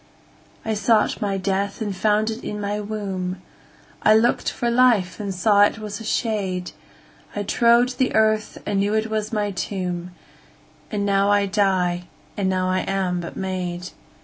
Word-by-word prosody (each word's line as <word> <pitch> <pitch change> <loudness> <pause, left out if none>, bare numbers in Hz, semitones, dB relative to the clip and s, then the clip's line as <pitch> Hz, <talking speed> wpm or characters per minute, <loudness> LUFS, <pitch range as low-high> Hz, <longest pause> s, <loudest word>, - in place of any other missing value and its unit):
13I 220 -1 -1
sought 215 0 +2
my 200 -2 0
death 195 +1 -1
and 205 -3 -3
found 215 +3 +2
it 220 +2 -7
in 210 - -4
my 205 0 -2
womb,14I 200 +1 -2
lookt 235 +2 +1
for 240 0 -1
life 235 -7 +3
and 200 -2 -3
saw 200 +2 +3
it 205 - +4
was 210 -2 -6
a - - -8
shade,15I 205 -1 -4
trode 235 +1 +4
the 255 0 -1
earth 215 0 +2
and 200 - 0
knew 205 +2 +1
it 220 0 -1
was 215 -1 -2
my 210 -2 -1
tomb,16And 180 +2 -6
now 200 0 +2
I 205 0 +3
die, 185 -3 +1 0.3
and 195 -3 0
now 185 -1 0
I 185 0 +1
am 190 -2 -1
but 170 - -7
made. 180 -2 -3
205 Hz, 155 wpm, -22 LUFS, 185-215 Hz, 0.3 s, it